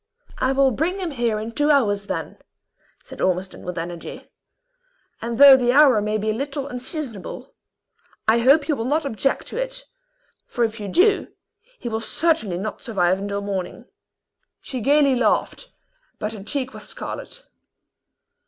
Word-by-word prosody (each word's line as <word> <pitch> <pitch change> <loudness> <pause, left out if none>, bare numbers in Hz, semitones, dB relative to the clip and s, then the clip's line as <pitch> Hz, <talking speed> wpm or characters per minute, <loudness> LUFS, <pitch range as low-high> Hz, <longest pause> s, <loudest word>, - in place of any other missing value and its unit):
"I 260 - +2
will 270 0 +3
bring 325 - -1
him 365 -4 -3
here 235 -5 0
in 220 +2 -5
two 295 +6 +1
hours, 205 -9 +2
then," - - -5 0.6
said - - -10
Ormiston, 185 +1 -1
with 180 -1 -6
energy; 170 0 -7 0.9
"and 230 0 -3
though 280 0 +10
the 245 -2 +2
hour 270 -6 +6
may 210 +1 -1
be 215 +1 -1
a - - -1
little 275 +3 -3
unseasonable, 255 - -6 0.7
I 225 +2 +5
hope 275 +5 +4
you 305 - +1
will 225 - -3
not 300 +4 0
object 275 +1 -1
to - - -3
it; - - -4 0.6
for 240 - -1
if 225 0 -1
you 205 - -5
do, 390 - +3 0.5
he - - -7
will 220 -1 -2
certainly 225 - 0
not 210 +3 -5
survive 190 -5 +1
until 200 0 -3
morning." 195 -3 -4 0.7
She 260 - -6
gayly 280 +2 +4
laughed, 240 -4 0 0.5
but 210 +1 -4
her 210 - -8
cheek 260 +5 -3
was - - -8
scarlet. - - -7
240 Hz, 160 wpm, -22 LUFS, 210-280 Hz, 0.9 s, though